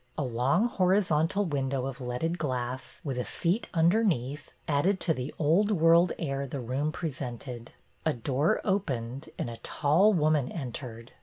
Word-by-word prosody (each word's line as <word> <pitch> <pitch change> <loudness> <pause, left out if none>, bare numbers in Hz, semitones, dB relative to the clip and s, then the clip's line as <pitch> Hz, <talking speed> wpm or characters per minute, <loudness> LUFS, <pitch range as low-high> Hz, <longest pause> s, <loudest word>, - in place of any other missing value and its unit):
A 150 - 0
long 130 - +2
hori 190 -4 +3
zontal 180 +1 +1
window 135 -3 -1
of 135 -1 -5
leaded 130 +8 -2
glass, 130 -2 -3
with 135 -4 -3
a - - 0
seat 180 - -1
un 165 0 +4
derneath, 150 - 0 0.2
added 165 +7 +2
to 160 - +2
the 130 0 -4
old 170 +7 +3
world 170 -2 +5
air 140 -3 -2
the 135 +1 -5
room 130 +5 -1
presented. 125 -6 -5 0.3
A 160 - +2
door 135 +5 0
opened 135 - -2
and - - -2
a 115 -1 -6
tall 155 - +3
woman 155 -7 +2
entered. 120 -5 -6
145 Hz, 160 wpm, -29 LUFS, 125-170 Hz, 0.3 s, world